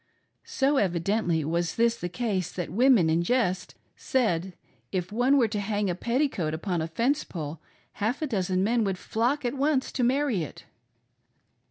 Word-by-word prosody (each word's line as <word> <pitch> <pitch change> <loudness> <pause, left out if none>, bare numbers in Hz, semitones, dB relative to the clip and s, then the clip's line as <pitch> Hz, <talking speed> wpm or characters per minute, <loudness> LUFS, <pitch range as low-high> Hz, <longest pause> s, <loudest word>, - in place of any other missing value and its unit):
So 275 +1 +1
evidently 175 - +1
was 170 +2 -1
this 235 0 +3
the 175 -6 -5
case 195 -3 -2
that 175 -4 -4
women 235 -3 +5
in 160 +1 +2
jest 185 -2 0 0.2
said 220 -11 +1
that, 185 +1 -10 0.4
if 180 -1 -2
one 250 +6 +3
were 240 -4 +4
to 210 0 -2
hang 205 -1 -1
a - - -1
petticoat 235 - -1
upon 175 0 -2
a 160 - -2
fence 245 - 0
pole, 155 -2 -6 0.3
half 230 +9 -2
a - - +2
dozen 190 -7 0
men 230 +2 +2
would 195 -2 -1
flock 245 +8 -1
at 240 - 0
once 280 -1 +1
to 255 - -1
marry 255 -5 +2
it 155 - -8
210 Hz, 175 wpm, -27 LUFS, 175-250 Hz, 0.4 s, women